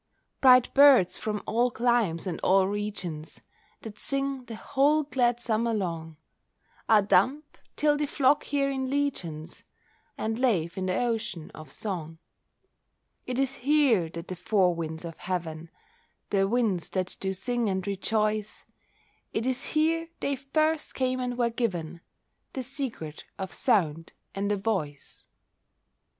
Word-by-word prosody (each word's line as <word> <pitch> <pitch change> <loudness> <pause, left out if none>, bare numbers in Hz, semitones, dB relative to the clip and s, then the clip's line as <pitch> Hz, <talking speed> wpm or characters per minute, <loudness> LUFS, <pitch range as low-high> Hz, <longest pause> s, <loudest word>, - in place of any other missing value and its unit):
Bright 255 -2 +6
birds 275 -10 +6
from 210 -1 -3
all 240 +3 +2
climes 235 -8 +1
and 180 -4 -3
all 190 0 +4
regions, 195 -6 -4 0.4
That 215 -2 -9
sing 275 -2 -1
the 230 -1 -7
whole 290 +7 +2
glad 245 -4 +1
summer 230 -1 0
long, 165 -5 -4 0.7
Are 215 -2 +6
dumb, 255 +10 +3 0.3
till 295 -1 +2
they 295 0 -1
flock 280 +1 +2
here 280 -1 +1
in 265 -1 -2
legions 180 - -3 0.5
And 220 +1 -2
lave 185 -11 +1
in 185 -1 -2
the 185 - 0
ocean 225 -9 -2
of 155 -3 -11
song. 165 -5 -5 1.1
It 250 -1 -2
is 270 0 0
here 260 - +3
that 170 +1 -8
the 185 - -5
four 180 0 +2
winds 160 0 -5
of 165 -1 -7
heaven, 165 -3 -4 0.6
The 195 -1 +3
winds 215 -6 0
that 185 -1 -2
do 190 - -1
sing 235 +4 -1
and 190 -1 -2
rejoice, 215 +1 -1 0.7
It 225 - -1
is 260 +1 0
here 330 +1 +1
they 280 - 0
first 310 +4 -1
came 255 -1 0
and 250 -1 -3
were 235 -1 +1
given 175 -9 -3 0.5
The 260 - -3
secret 245 - -6
of 190 -1 -5
sound 165 - +1 0.2
and 200 +1 -1
a 205 - +1
voice. 185 -9 -4
220 Hz, 140 wpm, -27 LUFS, 180-260 Hz, 1.1 s, Bright